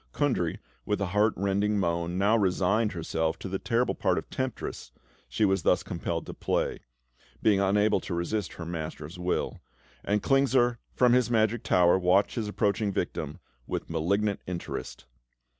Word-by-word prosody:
Kundry, 125 Hz, -, 0 dB, 0.3 s
with 105 Hz, -, -1 dB
a 100 Hz, -, 0 dB
heart 105 Hz, +1 st, +3 dB
rending 100 Hz, +2 st, +1 dB
moan, 85 Hz, -1 st, -1 dB
now 100 Hz, +4 st, +3 dB
resigned 100 Hz, +2 st, +2 dB
herself 80 Hz, -1 st, -1 dB
to -, -, -7 dB
the 95 Hz, 0 st, -3 dB
terrible 120 Hz, +1 st, +1 dB
part -, -, +1 dB
of -, -, -3 dB
temptress 130 Hz, -, -4 dB, 0.4 s
she 110 Hz, -, +1 dB
was 95 Hz, -2 st, +2 dB
thus -, -, +2 dB
compelled -, -, -3 dB
to -, -, -7 dB
play, -, -, -1 dB, 0.6 s
being 105 Hz, -3 st, +4 dB
unable 105 Hz, +2 st, +3 dB
to 90 Hz, -, -5 dB
resist 85 Hz, +2 st, -2 dB
her 85 Hz, -, -7 dB
master's 80 Hz, 0 st, -6 dB
will; 90 Hz, 0 st, -2 dB, 0.4 s
and 105 Hz, 0 st, 0 dB
Klingsor, 130 Hz, -3 st, +3 dB, 0.2 s
from 125 Hz, -1 st, +4 dB
his 125 Hz, -1 st, +3 dB
magic 110 Hz, -1 st, +2 dB
tower, 90 Hz, +1 st, +4 dB
watched 95 Hz, +2 st, +3 dB
his 115 Hz, -4 st, -2 dB
approaching 105 Hz, 0 st, 0 dB
victim 75 Hz, -4 st, -3 dB, 0.3 s
with -, -, -4 dB
malignant 100 Hz, +5 st, 0 dB
interest. 85 Hz, -8 st, -5 dB
100 Hz, 160 wpm, -28 LUFS, 90-110 Hz, 0.6 s, being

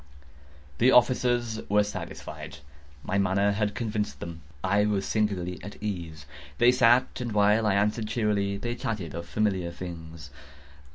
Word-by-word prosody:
The 125 Hz, -, +5 dB
officers 120 Hz, -2 st, +3 dB
were 105 Hz, +1 st, +4 dB
satisfied. 105 Hz, -, -7 dB, 0.5 s
My 100 Hz, -, 0 dB
manner 100 Hz, +1 st, +2 dB
had 105 Hz, 0 st, -1 dB
convinced 105 Hz, -, -2 dB
them. 85 Hz, -1 st, -7 dB, 0.2 s
I 100 Hz, +2 st, +3 dB
was 100 Hz, -2 st, 0 dB
singularly 95 Hz, -5 st, -1 dB
at 100 Hz, -, -8 dB
ease. 85 Hz, -7 st, -5 dB, 0.3 s
They 120 Hz, -, +6 dB
sat, 125 Hz, 0 st, +3 dB
and 120 Hz, -3 st, -3 dB
while 105 Hz, +1 st, +4 dB
I 100 Hz, -, +3 dB
answered 105 Hz, +2 st, +1 dB
cheerily, 105 Hz, -3 st, 0 dB
they 120 Hz, +4 st, -3 dB
chatted 105 Hz, -, -4 dB
of 85 Hz, +1 st, -6 dB
familiar 95 Hz, -5 st, 0 dB
things. 80 Hz, -4 st, -8 dB
105 Hz, 145 wpm, -27 LUFS, 90-110 Hz, 0.5 s, They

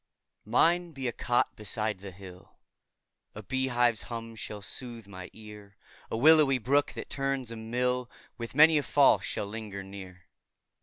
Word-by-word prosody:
Mine 170 Hz, +8 st, +3 dB
be 135 Hz, -2 st, -4 dB
a -, -, 0 dB
cot 120 Hz, +2 st, 0 dB
beside 105 Hz, -1 st, -3 dB
the 100 Hz, 0 st, -8 dB
hill, 95 Hz, -1 st, -13 dB, 0.8 s
A 105 Hz, -, -8 dB
bee 130 Hz, +3 st, -1 dB
hive's 120 Hz, -3 st, +2 dB
hum 115 Hz, -1 st, -7 dB
shall 105 Hz, -2 st, -7 dB
sooth 115 Hz, +2 st, -6 dB
my 95 Hz, -2 st, -9 dB
ear; 105 Hz, -1 st, -13 dB, 0.3 s
A -, -, -2 dB
willowy 150 Hz, 0 st, +6 dB
brook, 140 Hz, +5 st, +1 dB
that -, -, -7 dB
turns 135 Hz, -3 st, -2 dB
a -, -, -5 dB
mill, 125 Hz, +2 st, -1 dB, 0.3 s
With 115 Hz, +1 st, -7 dB
many 155 Hz, +1 st, +7 dB
a -, -, 0 dB
fall 140 Hz, 0 st, +4 dB
shall -, -, -4 dB
linger 105 Hz, -2 st, -6 dB
near. 95 Hz, -2 st, -11 dB
115 Hz, 160 wpm, -29 LUFS, 105-130 Hz, 0.8 s, many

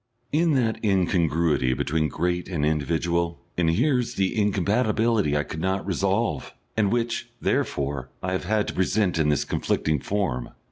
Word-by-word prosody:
In 160 Hz, +1 st, +3 dB
that 115 Hz, -4 st, 0 dB
incongruity 85 Hz, -, +2 dB
between 80 Hz, +3 st, 0 dB
great 90 Hz, +3 st, -2 dB
and 80 Hz, -6 st, 0 dB
individual 85 Hz, +3 st, 0 dB, 0.2 s
inheres 120 Hz, -, +1 dB
the 95 Hz, -1 st, 0 dB
incompatibility 105 Hz, -, +2 dB
I 75 Hz, -, +1 dB
could 80 Hz, -, -7 dB
not 95 Hz, +2 st, -1 dB
resolve, 95 Hz, -, -1 dB, 0.2 s
and 105 Hz, -3 st, +2 dB
which, 120 Hz, -1 st, -1 dB
therefore, 70 Hz, -2 st, -1 dB
I 90 Hz, -, -1 dB
have 95 Hz, 0 st, -2 dB
had 105 Hz, +2 st, +1 dB
to -, -, -4 dB
present 95 Hz, -2 st, +1 dB
in 75 Hz, -1 st, +3 dB
this 75 Hz, -, +1 dB
conflicting 75 Hz, -2 st, 0 dB
form. 70 Hz, -10 st, -2 dB
90 Hz, 145 wpm, -25 LUFS, 80-105 Hz, 0.2 s, In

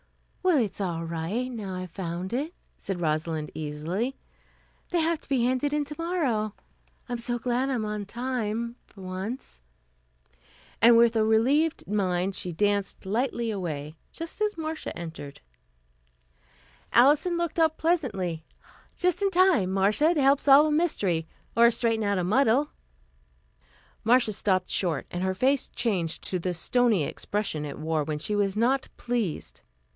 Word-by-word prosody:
"Well, 365 Hz, -4 st, +3 dB
it's 215 Hz, -5 st, -1 dB
all 170 Hz, -3 st, -2 dB
right, 170 Hz, +10 st, -3 dB
now 205 Hz, -6 st, -5 dB
I've 185 Hz, -1 st, -6 dB
found 180 Hz, +2 st, -4 dB
it," 295 Hz, +8 st, -2 dB, 0.2 s
said 195 Hz, -3 st, -5 dB
Rosalind 155 Hz, -1 st, -1 dB
easily. 160 Hz, -, -3 dB, 0.7 s
"They 350 Hz, -, +1 dB
have 325 Hz, 0 st, +1 dB
to -, -, -17 dB
be 255 Hz, -4 st, +2 dB
handed 260 Hz, +3 st, +1 dB
in 295 Hz, 0 st, 0 dB
tomorrow. 290 Hz, -, -1 dB, 0.5 s
I'm 245 Hz, -2 st, -3 dB
so 240 Hz, +1 st, -1 dB
glad 245 Hz, +3 st, 0 dB
I'm 240 Hz, -5 st, -1 dB
on 210 Hz, -1 st, -3 dB
time, 235 Hz, -1 st, -3 dB
for 195 Hz, -, -15 dB
once." 185 Hz, -, -6 dB, 1.2 s
And 230 Hz, +1 st, +8 dB
with 235 Hz, 0 st, +5 dB
a 220 Hz, -, +3 dB
relieved 265 Hz, +9 st, +2 dB
mind 190 Hz, -2 st, 0 dB
she 180 Hz, -, -4 dB
danced 205 Hz, +3 st, -1 dB
lightly 235 Hz, +2 st, -1 dB
away, 155 Hz, -6 st, -4 dB, 0.2 s
just 330 Hz, +5 st, -8 dB
as 420 Hz, -3 st, 0 dB
Marcia 315 Hz, -, -4 dB
entered. 160 Hz, -4 st, -8 dB, 1.5 s
Alison 295 Hz, +8 st, +4 dB
looked 340 Hz, 0 st, -2 dB
up 320 Hz, -1 st, +3 dB
pleasantly. 200 Hz, -, -1 dB, 0.5 s
"Just 360 Hz, +1 st, +1 dB
in 400 Hz, -, +3 dB
time, 360 Hz, -, +4 dB
Marcia, 210 Hz, -, +3 dB
to 295 Hz, -, +2 dB
help 275 Hz, +1 st, +5 dB
solve 285 Hz, +2 st, +7 dB
a 310 Hz, -, +1 dB
mystery, 200 Hz, -, +1 dB, 0.3 s
or 235 Hz, 0 st, +7 dB
straighten 225 Hz, -2 st, +1 dB
out 200 Hz, -1 st, +1 dB
a 180 Hz, -, 0 dB
muddle." 255 Hz, +8 st, +3 dB, 1.3 s
Marcia 235 Hz, -1 st, +4 dB
stopped 190 Hz, -2 st, 0 dB
short 165 Hz, -7 st, 0 dB
and 175 Hz, -, -3 dB
her 190 Hz, 0 st, 0 dB
face 265 Hz, +6 st, +2 dB
changed 185 Hz, -9 st, -1 dB
to 185 Hz, -, -2 dB
the 180 Hz, +1 st, -2 dB
stony 225 Hz, 0 st, +2 dB
expression 195 Hz, -1 st, -2 dB
it 145 Hz, -, -6 dB
wore 155 Hz, 0 st, -1 dB
when 150 Hz, 0 st, -3 dB
she 210 Hz, +8 st, -2 dB
was 200 Hz, -1 st, 0 dB
not 255 Hz, +4 st, +1 dB
pleased. 235 Hz, -9 st, -3 dB
220 Hz, 150 wpm, -27 LUFS, 185-270 Hz, 1.5 s, And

